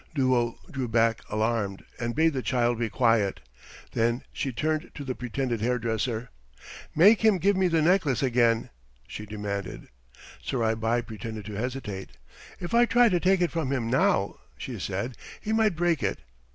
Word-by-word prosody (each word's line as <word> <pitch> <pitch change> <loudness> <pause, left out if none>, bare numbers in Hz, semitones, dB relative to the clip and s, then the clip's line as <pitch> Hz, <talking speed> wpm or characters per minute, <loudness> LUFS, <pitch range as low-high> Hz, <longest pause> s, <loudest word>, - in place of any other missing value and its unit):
Duo 125 -4 +2
drew 130 -2 -3
back 115 0 +2
alarmed 110 -3 -1
and 120 0 -2
bade 160 +1 +3
the 130 - -2
child 120 -2 +1
be 115 -1 0
quiet. 115 -6 +2 0.5
Then 120 +2 0
she 135 - -2
turned 155 +5 -1
to 145 - -6
the 130 -2 -3
pretended 125 -2 -3
hairdresser. 115 0 -1 0.6
"Make 200 +7 +6
him 220 -3 +5
give 200 +3 +2
me 190 0 +3
the 165 -2 +2
necklace 160 - +2
again," 120 -3 +2 0.4
she 105 - -7
demanded. 100 -2 -5 0.5
Surai 115 -4 0
Bai 115 +2 0
pretended 110 -1 -7
to 105 - -7
hesitate. 110 -3 -5 0.4
"If 175 - -6
I 240 +1 +6
try 240 +2 +5
to 180 -3 +2
take 185 +1 +3
it 175 - +2
from 160 -5 -2
him 120 -4 -1
now," 100 -6 +2 0.2
she - - -6
said, 120 -1 -3 0.2
"he 215 - -3
might 220 -4 +3
break 170 -2 +1
it. - - 0
125 Hz, 165 wpm, -27 LUFS, 115-160 Hz, 0.6 s, Make